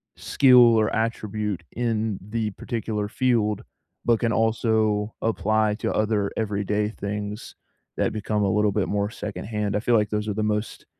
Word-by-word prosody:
skill 130 Hz, -2 st, +5 dB, 0.2 s
or 110 Hz, -1 st, +2 dB
attribute 105 Hz, -4 st, -2 dB
in 110 Hz, -3 st, -1 dB
the 110 Hz, -1 st, -1 dB
particular 105 Hz, 0 st, -3 dB
field, 115 Hz, -3 st, 0 dB, 0.4 s
but 115 Hz, -2 st, +3 dB
can 115 Hz, -, +1 dB
also 110 Hz, -2 st, +1 dB
apply 110 Hz, 0 st, +1 dB
to -, -, -2 dB
other 105 Hz, -2 st, +1 dB
everyday 105 Hz, -1 st, -1 dB
things 105 Hz, +1 st, -5 dB, 0.4 s
that -, -, 0 dB
become 105 Hz, -1 st, -1 dB
a 100 Hz, -, +2 dB
little 105 Hz, 0 st, +2 dB
bit 105 Hz, -1 st, 0 dB
more 100 Hz, 0 st, 0 dB
secondhand, 105 Hz, 0 st, -4 dB
I -, -, +2 dB
feel 120 Hz, +3 st, 0 dB
like 105 Hz, -1 st, +2 dB
those 105 Hz, 0 st, -2 dB
are 105 Hz, -, -1 dB
the 110 Hz, -, -2 dB
most 105 Hz, +1 st, -2 dB
105 Hz, 160 wpm, -24 LUFS, 105-110 Hz, 0.4 s, skill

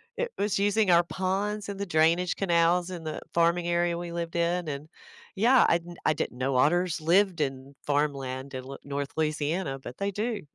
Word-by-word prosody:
It 485 Hz, 0 st, -2 dB
was 205 Hz, 0 st, 0 dB
using 205 Hz, -1 st, +3 dB
our 170 Hz, 0 st, +6 dB
ponds 195 Hz, +4 st, -2 dB
and 200 Hz, -1 st, -6 dB
the 200 Hz, -, -2 dB
drainage 165 Hz, +2 st, +2 dB
canals 175 Hz, 0 st, +2 dB
in 170 Hz, -2 st, -6 dB
the 155 Hz, -1 st, -4 dB
farming 170 Hz, +1 st, +2 dB
area 170 Hz, 0 st, +1 dB
we 175 Hz, 0 st, -5 dB
lived 170 Hz, 0 st, -4 dB
in, 170 Hz, 0 st, 0 dB
and 145 Hz, +2 st, -5 dB, 0.5 s
yeah, 240 Hz, +6 st, +5 dB
I 170 Hz, -, +3 dB, 0.3 s
I 155 Hz, -, +4 dB
didn't 125 Hz, -, -4 dB
know 130 Hz, +1 st, -1 dB
otters 170 Hz, +5 st, +2 dB
lived 180 Hz, 0 st, +3 dB
in 135 Hz, 0 st, -3 dB
farmland 140 Hz, -2 st, -2 dB
in 130 Hz, 0 st, -5 dB
L 135 Hz, -, -8 dB
North 140 Hz, 0 st, -3 dB
Louisiana, 155 Hz, -1 st, -1 dB
but 125 Hz, -1 st, -9 dB
they 200 Hz, 0 st, -1 dB
do. 215 Hz, +2 st, -2 dB
170 Hz, 190 wpm, -27 LUFS, 145-190 Hz, 0.5 s, our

